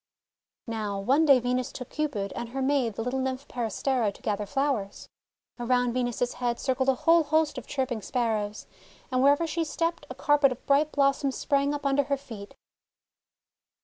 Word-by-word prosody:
Now, 215 Hz, -4 st, -3 dB
one 270 Hz, +10 st, +3 dB
day 275 Hz, -4 st, +7 dB
Venus 250 Hz, +1 st, -1 dB
took 250 Hz, -, -8 dB
Cupid, 245 Hz, -11 st, -2 dB
and 240 Hz, -1 st, -5 dB
her 265 Hz, +3 st, -4 dB
maid 260 Hz, -6 st, +1 dB
the 225 Hz, -, -3 dB
little 250 Hz, +2 st, -2 dB
Nymph 260 Hz, +1 st, -3 dB
Peris 230 Hz, -4 st, -4 dB
tera, 250 Hz, -6 st, +2 dB
to -, -, -17 dB
gather 205 Hz, -1 st, -2 dB
flowers. 270 Hz, -6 st, -2 dB, 0.5 s
Around 245 Hz, 0 st, +1 dB
Venus's 245 Hz, -1 st, -1 dB
head 240 Hz, -1 st, 0 dB
circled 260 Hz, 0 st, 0 dB
a 265 Hz, -, +3 dB
whole 330 Hz, +6 st, +4 dB
host 315 Hz, 0 st, +1 dB
of -, -, -14 dB
chirping 260 Hz, -5 st, -2 dB
Sparrows, 215 Hz, -4 st, -2 dB, 0.5 s
and 255 Hz, 0 st, +2 dB
wherever 285 Hz, +4 st, +4 dB
she 330 Hz, +1 st, -1 dB
stepped, 330 Hz, +2 st, -2 dB
a -, -, -7 dB
carpet 290 Hz, -2 st, +3 dB
of 250 Hz, -, -7 dB
bright 290 Hz, +2 st, +3 dB
blossoms 275 Hz, -1 st, +1 dB
sprang 280 Hz, 0 st, +1 dB
up 290 Hz, -1 st, -4 dB
under 275 Hz, 0 st, +2 dB
her 280 Hz, 0 st, 0 dB
feet. 225 Hz, -7 st, -10 dB
260 Hz, 180 wpm, -27 LUFS, 235-285 Hz, 0.5 s, day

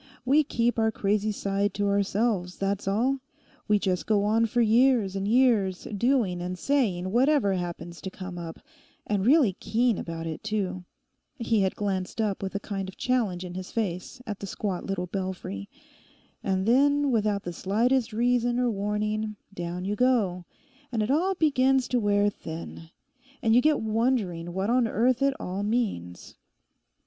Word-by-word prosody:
'We 290 Hz, +4 st, +4 dB
keep 235 Hz, -4 st, 0 dB
our 220 Hz, 0 st, +3 dB
crazy 210 Hz, +1 st, 0 dB
side 200 Hz, 0 st, -1 dB
to 205 Hz, -, 0 dB
ourselves; 200 Hz, -2 st, 0 dB
that's 195 Hz, 0 st, -2 dB
all. 245 Hz, +7 st, +1 dB, 0.5 s
We 210 Hz, -1 st, +4 dB
just 185 Hz, -3 st, -1 dB
go 210 Hz, -2 st, +3 dB
on 225 Hz, +2 st, +2 dB
for 240 Hz, +3 st, -1 dB
years 230 Hz, -3 st, +4 dB
and 195 Hz, 0 st, -2 dB
years 220 Hz, -6 st, +3 dB
doing 220 Hz, -6 st, +1 dB
and 180 Hz, +1 st, -4 dB
saying 190 Hz, -9 st, 0 dB
whatever 255 Hz, -3 st, +3 dB
happens 175 Hz, -1 st, -5 dB
to 190 Hz, -, -5 dB
come 185 Hz, -1 st, -7 dB
up—and 175 Hz, +4 st, -6 dB
really 270 Hz, -, +5 dB
keen 235 Hz, -2 st, +1 dB
about 165 Hz, -1 st, -5 dB
it 160 Hz, -1 st, -5 dB
too'—he 210 Hz, +4 st, -4 dB
had 190 Hz, -1 st, +1 dB
glanced 190 Hz, -1 st, -3 dB
up 210 Hz, -3 st, 0 dB
with 195 Hz, 0 st, -4 dB
a -, -, 0 dB
kind 195 Hz, -2 st, -4 dB
of 190 Hz, -, -12 dB
challenge 215 Hz, -8 st, 0 dB
in 175 Hz, -, -7 dB
his 185 Hz, 0 st, -7 dB
face 200 Hz, +2 st, -3 dB
at 210 Hz, -4 st, -5 dB
the 200 Hz, -, -6 dB
squat 190 Hz, -1 st, -3 dB
little 195 Hz, -2 st, -2 dB
belfry—'and 185 Hz, -, -6 dB
then, 285 Hz, +4 st, +3 dB
without 210 Hz, -3 st, +1 dB
the 175 Hz, -, -5 dB
slightest 230 Hz, +7 st, +1 dB
reason 240 Hz, +1 st, +1 dB
or 245 Hz, -1 st, +2 dB
warning, 210 Hz, +1 st, -2 dB, 0.2 s
down 175 Hz, 0 st, -4 dB
you 205 Hz, +2 st, -1 dB
go, 210 Hz, -8 st, +1 dB, 0.5 s
and 225 Hz, -3 st, 0 dB
it 220 Hz, -, -1 dB
all 365 Hz, +7 st, +2 dB
begins 270 Hz, -5 st, +3 dB
to 250 Hz, -, +2 dB
wear 205 Hz, -1 st, +2 dB
thin, 165 Hz, -2 st, -8 dB, 0.5 s
and 225 Hz, -1 st, +3 dB
you 245 Hz, -, +6 dB
get 305 Hz, 0 st, +3 dB
wondering 215 Hz, -7 st, 0 dB
what 190 Hz, +5 st, -1 dB
on 245 Hz, -1 st, +3 dB
earth 240 Hz, +3 st, +1 dB
it 275 Hz, 0 st, +2 dB
all 185 Hz, +2 st, -4 dB
means. 205 Hz, -, -3 dB
210 Hz, 160 wpm, -27 LUFS, 185-240 Hz, 0.5 s, you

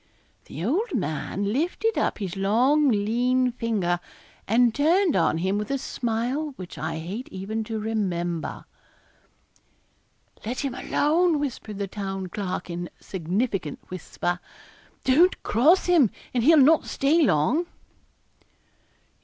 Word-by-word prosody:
The 160 Hz, +5 st, -6 dB
old 350 Hz, -, 0 dB
man 195 Hz, +3 st, -2 dB
lifted 355 Hz, -, 0 dB
up -, -, 0 dB
his 195 Hz, -4 st, -4 dB
long 250 Hz, +10 st, +3 dB
lean 245 Hz, +4 st, +1 dB
finger, 210 Hz, -8 st, -1 dB, 0.5 s
and 235 Hz, +2 st, +4 dB
turned 330 Hz, -, +3 dB
on 165 Hz, -2 st, +2 dB
him 190 Hz, +4 st, 0 dB
with 210 Hz, -, -4 dB
a 275 Hz, -, 0 dB
smile 255 Hz, +5 st, -2 dB
which 185 Hz, -6 st, -9 dB
I -, -, -3 dB
hate 190 Hz, +10 st, -6 dB
even 205 Hz, +4 st, -4 dB
to 225 Hz, 0 st, -4 dB
remember. 180 Hz, -6 st, -2 dB, 1.8 s
'Let 240 Hz, +4 st, -3 dB
him 275 Hz, -3 st, -2 dB
alone,' 320 Hz, +5 st, +2 dB
whispered 250 Hz, -7 st, -4 dB
the 200 Hz, -, -2 dB
Town 195 Hz, -1 st, -5 dB
Clerk, 190 Hz, -1 st, -4 dB
in 175 Hz, 0 st, -4 dB
a -, -, -24 dB
significant 190 Hz, -, -2 dB
whisper, 175 Hz, 0 st, -3 dB, 0.6 s
'don't 325 Hz, +8 st, +4 dB
cross 300 Hz, -, +4 dB
him, 335 Hz, -, +5 dB, 0.2 s
and 240 Hz, -2 st, +1 dB
he'll 320 Hz, +5 st, +6 dB
not 300 Hz, +3 st, +5 dB
stay 300 Hz, +5 st, +2 dB
long.' 290 Hz, -, +2 dB
225 Hz, 130 wpm, -25 LUFS, 190-285 Hz, 1.8 s, he'll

